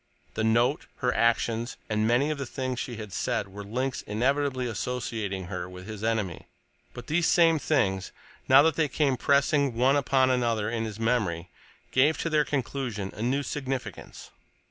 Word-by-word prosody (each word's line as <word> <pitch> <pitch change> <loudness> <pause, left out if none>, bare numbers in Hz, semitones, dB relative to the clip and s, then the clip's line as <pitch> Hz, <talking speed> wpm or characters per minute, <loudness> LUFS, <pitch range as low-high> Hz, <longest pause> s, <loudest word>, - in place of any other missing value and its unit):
The 110 - -2
note, 120 +6 +2
her 125 -1 0
actions, 115 +1 +1
and 110 0 +1
many 130 +6 +2
of 150 - -4
the 135 - -4
things 130 -1 -3
she 120 - -4
had 105 -3 -8
said 100 - -1
were 100 +2 -8
links 125 +6 -2
inevitably 130 +4 0
associating 115 -4 -3
her 90 0 -5
with 90 0 -10
his 110 0 -7
enemy, 110 -6 -2 0.5
but 120 - -8
these 165 +4 +1
same 165 -2 +4
things, 100 -12 0 0.4
now 135 +2 +8
that 160 0 +3
they 160 -2 +2
came 140 -1 +1
pressing 140 0 +2
one 130 +4 +3
upon 130 -2 +3
another 115 -4 0
in 115 -1 -1
his 110 -1 -7
memory, 100 -8 0 0.4
gave 145 +5 +3
to 165 - -2
their 150 -1 +4
collusion 125 -7 -3
a 105 - -7
new 135 +5 0
significance. 135 -3 -5
125 Hz, 170 wpm, -27 LUFS, 110-140 Hz, 0.5 s, now